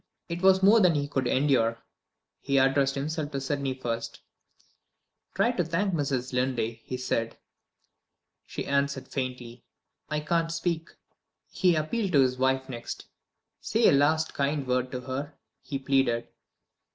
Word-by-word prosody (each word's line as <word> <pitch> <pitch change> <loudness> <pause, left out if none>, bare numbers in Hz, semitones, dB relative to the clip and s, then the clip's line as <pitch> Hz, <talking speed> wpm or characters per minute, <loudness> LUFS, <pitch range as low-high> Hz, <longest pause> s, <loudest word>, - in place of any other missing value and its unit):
It 170 +1 -4
was 190 0 +5
more 210 +4 +7
than 180 -5 +4
he 145 -1 0
could 135 -3 -1
endure. 125 -5 +2 0.6
He 140 0 0
addressed 135 +1 +3
himself 150 +2 -3
to 135 - -1
Sydney 135 -1 -2
first. 115 -3 -4 1.1
"Try 200 +5 +3
to 195 -8 0
thank 175 +4 -1
Mrs. 135 -5 -1
Linley," 120 -3 -1
he 130 - -5
said. 115 -3 -2 1.1
She - - -5
answered 140 -1 0
faintly: 125 -3 -5 0.5
"I 150 0 -1
can't 165 +2 0
speak!" 165 -1 -2 0.6
He 180 -2 +3
appealed 180 +5 -1
to 140 - +6
his 130 -1 +1
wife 130 0 +1
next. 120 -3 -7 0.5
"Say - - +3
a - - +5
last 155 +3 +2
kind 140 0 -1
word 125 0 0
to 125 - -4
her," 140 +4 -5 0.3
he 140 - -4
pleaded. 130 -3 +1
140 Hz, 145 wpm, -27 LUFS, 130-160 Hz, 1.1 s, more